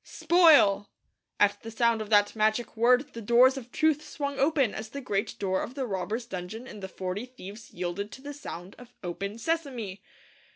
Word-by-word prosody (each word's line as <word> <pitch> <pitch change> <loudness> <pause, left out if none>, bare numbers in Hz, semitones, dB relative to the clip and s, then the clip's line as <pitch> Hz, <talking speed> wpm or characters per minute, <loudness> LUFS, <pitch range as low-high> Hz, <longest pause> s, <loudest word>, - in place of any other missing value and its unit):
'Spoil!' 320 - +5 0.5
at 205 0 +3
the 225 - -7
sound 230 0 +1
of 215 - -6
that 205 -1 +4
magic 220 +2 0
word 250 +5 +3
the 230 - -7
doors 240 +4 +5
of 250 -3 -8
truth 310 -2 +2
swung 280 -2 -4
open 275 -5 +2
as 215 0 -6
the 280 - -6
great 205 -5 -2
door 190 -2 0
of 250 - -6
the 270 -2 -2
robbers' 215 +3 -3
dungeon 195 +3 -6
in 215 - -10
The 190 - -6
Forty 190 +6 -4
Thieves 220 -3 -11
yielded 180 +4 -4
to 265 - -10
the 290 0 -6
sound 190 -10 -8
of 245 0 -15
'Open, 200 +4 -4
Sesame!' 250 - -3
230 Hz, 190 wpm, -28 LUFS, 200-265 Hz, 0.5 s, Spoil